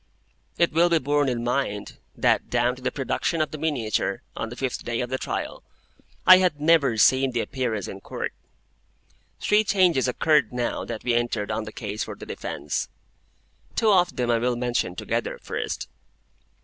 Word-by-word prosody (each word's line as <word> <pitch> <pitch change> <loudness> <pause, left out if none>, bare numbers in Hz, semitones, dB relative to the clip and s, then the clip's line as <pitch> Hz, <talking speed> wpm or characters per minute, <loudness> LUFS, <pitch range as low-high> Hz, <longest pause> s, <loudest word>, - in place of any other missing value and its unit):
It 170 -2 +2
will 170 +2 +4
be 170 - +4
borne 145 -1 +1
in 120 -2 -2
mind 120 -4 -2 0.2
that - - +2
down 120 +1 +1
to 130 - -14
the 130 - -1
production 145 +4 -1
of 155 - 0
the 155 - -6
miniature, 140 -9 -1
on 115 - -4
the 120 - -8
fifth 130 0 -3
day 120 -1 -2
of 125 0 -3
the 130 - -1
trial, - - -4 0.6
I 185 0 +10
had 180 -6 +1
never 150 -6 +4
seen 130 +4 +4
the 120 - +1
Appearance 115 -7 -2
in 95 - -8
Court. - - -5 1.1
Three 210 +1 +3
changes 180 -10 +3
occurred 140 -1 +2
now 120 -1 -2
that - - -6
we 120 - +1
entered 120 -3 0
on 110 - -2
the 110 - -7
case 105 -1 -4
for - - -7
the - - -10
defence. - - -4 0.9
Two 220 -2 +3
of 180 -2 +3
them 120 -1 0
I 115 - +3
will 125 +1 0
mention 120 -7 -1
together, - - -2
first. - - -4
130 Hz, 180 wpm, -25 LUFS, 120-155 Hz, 1.1 s, I